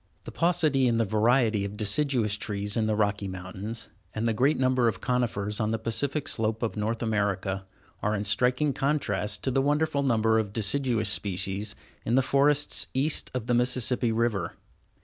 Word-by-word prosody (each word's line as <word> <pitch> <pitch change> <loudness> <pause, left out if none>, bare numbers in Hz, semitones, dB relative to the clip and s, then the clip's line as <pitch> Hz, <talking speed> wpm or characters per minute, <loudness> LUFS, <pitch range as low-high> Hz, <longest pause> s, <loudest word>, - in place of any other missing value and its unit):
The - - -7
paucity 155 -6 +2
in 115 -1 +2
the 115 - +2
variety 110 0 +2
of 100 +1 -5
deciduous 115 0 +1
trees 105 0 -3
in 110 -1 +1
the 110 - +1
Rocky 105 -1 0
Mountains, 95 +4 -6 0.3
and 110 +1 -1
the 115 - +2
great 135 +7 +2
number 130 -2 +2
of 115 - -1
conifers 110 -5 -1
on 110 - 0
the 115 - 0
Pacific 140 +6 -2
slope 110 0 -1
of 115 - -2
North 110 +2 -2
America, 100 -3 -1 0.4
are 105 +1 0
in 100 - -2
striking 125 +7 +1
contrast 130 -9 -1
to 130 - +1
the 135 +1 +2
wonderful 145 +1 +1
number 110 -4 +2
of 105 -2 -3
deciduous 115 +1 +1
species 100 +2 -1 0.3
in 115 - 0
the 135 - +4
forests 140 +2 +2
east 145 +4 +1
of 125 -3 -2
the 120 - 0
Mississippi 125 0 +1
River. 110 -6 -1
115 Hz, 175 wpm, -27 LUFS, 105-130 Hz, 0.4 s, the